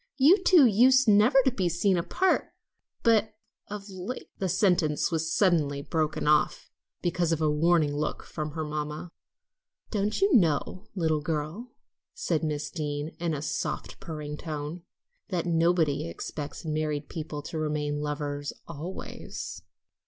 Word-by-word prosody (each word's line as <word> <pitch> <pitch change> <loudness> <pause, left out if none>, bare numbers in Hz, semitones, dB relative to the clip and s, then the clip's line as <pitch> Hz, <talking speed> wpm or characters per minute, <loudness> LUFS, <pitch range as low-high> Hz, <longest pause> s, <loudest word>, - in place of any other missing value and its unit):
"You 330 +9 +6
two 350 -6 +7
used 250 +4 +5
never 215 +6 +5
to 265 - +4
be 190 -7 0
seen 185 +3 +2
apart; 185 - +1 0.5
but 220 -2 +3 0.3
of 205 -1 -7
late 190 +5 -7
" - - -44
The 190 - 0
sentence 175 -6 +2
was 160 0 -1
suddenly 155 -8 +2
broken 155 -1 -1
off 150 0 +2 0.3
because 175 -1 +1
of 165 - +1
a 155 -1 +2
warning 155 -1 +3
look 150 +1 -2
from 155 -2 -5
her 160 0 -3
mamma. 150 +2 -4 0.8
"Don't 210 -1 0
you 390 -2 +3
know, 180 - +2
little 160 -4 +1
girl," 160 +10 -4 0.4
said 170 - -1
Miss 150 -1 -2
Deane 150 -2 -3
in 170 -2 -1
a 145 - -5
soft, - - -3
purring 150 -2 -6
tone, 155 +2 -5 0.5
"that 175 -2 -1
nobody 165 - +2
expects 145 - -6
married 155 -2 -2
people 150 -3 -6
to 160 +2 -5
remain 150 -1 -1
lovers 145 -1 -3
always?" 170 +3 -7
160 Hz, 145 wpm, -28 LUFS, 150-190 Hz, 0.8 s, two